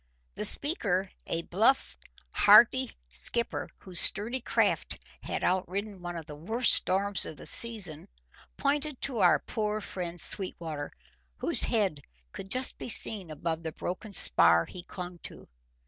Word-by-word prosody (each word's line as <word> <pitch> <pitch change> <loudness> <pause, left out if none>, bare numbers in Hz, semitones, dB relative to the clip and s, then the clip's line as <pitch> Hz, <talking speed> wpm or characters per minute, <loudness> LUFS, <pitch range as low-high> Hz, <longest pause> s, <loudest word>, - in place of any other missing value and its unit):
The - - -4
speaker, 200 - -1 0.2
a 165 0 -2
bluff, 225 +11 0 0.4
hearty 260 +1 +5 0.2
skipper, 65 - +1
whose 185 -3 -4
sturdy 235 +6 0
craft - - -1 0.2
had - - -5
outridden 190 +2 -2
one 175 0 -7
of 165 -2 -7
the 150 -1 -10
worst 225 +11 +3
storms 195 0 +2
of 155 - -6
the - - -12
season, 200 -10 +4 0.5
pointed 290 0 -2
to 250 -5 0
our 180 -3 +4
poor 215 -1 -4
friend 175 -4 -6
Sweetwater, 165 -7 -2 0.5
whose - - -1
head 195 -10 -1 0.3
could 190 - -10
just 255 +3 -1
be - - -6
seen 205 -5 +1
above 160 +2 -4
the 160 -2 -6
broken 195 +4 -7
spar 85 - +5
he 180 - -9
clung 180 0 -9
to. - - -12
190 Hz, 145 wpm, -28 LUFS, 170-225 Hz, 0.5 s, hearty